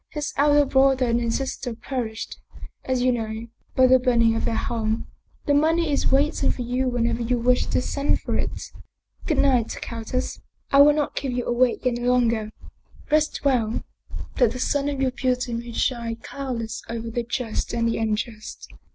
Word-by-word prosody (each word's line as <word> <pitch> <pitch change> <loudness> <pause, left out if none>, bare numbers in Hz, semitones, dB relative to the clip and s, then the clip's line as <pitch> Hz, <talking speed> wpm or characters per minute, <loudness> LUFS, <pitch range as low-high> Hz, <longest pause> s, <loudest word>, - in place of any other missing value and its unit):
His 295 -1 -4
elder 290 0 +4
brother 265 -1 +3
and 235 0 +1
his 230 -1 0
sister 260 -3 -4
perished, 230 -3 -5 0.4
as 255 -1 0
you 255 - +4
know, 225 -1 -3 0.3
by 260 - +6
the 255 0 +6
burning 235 -3 +3
of - - -1
their 225 - 0
home. 220 -1 -1 0.4
The 290 - +2
money 320 +2 +2
is 280 - +1
wait 285 +3 +2
ing - - +3
for 250 - -2
you 250 +2 0
whenever 240 -1 0
you 245 +1 +1
wish 250 +1 +2
to - - 0
send 280 +2 0
for - - -3
it. - - -3 0.6
Good 310 - +1
night, 255 -5 +2
countess. 230 +2 -4 0.3
I 275 - +7
will 295 +1 +7
not 295 -1 -1
keep 270 -3 -2
you 245 -1 -2
awake 245 +1 +1
any 240 -1 0
longer. 235 -3 +2 0.6
Rest 305 -1 +1
well, 235 -5 +1 0.5
that 245 -4 +3
the 255 - -6
sun 285 +2 0
of 280 -2 -3
your 260 - +1
beauty 250 -1 -1
may 235 +1 -4
shine 235 -1 -1
cloudless 230 -2 -5
over 230 0 -4
the 240 - -1
just 240 -1 -3
and 230 -1 0
the 230 - -1
unjust. 220 0 -3
250 Hz, 185 wpm, -24 LUFS, 230-270 Hz, 0.6 s, I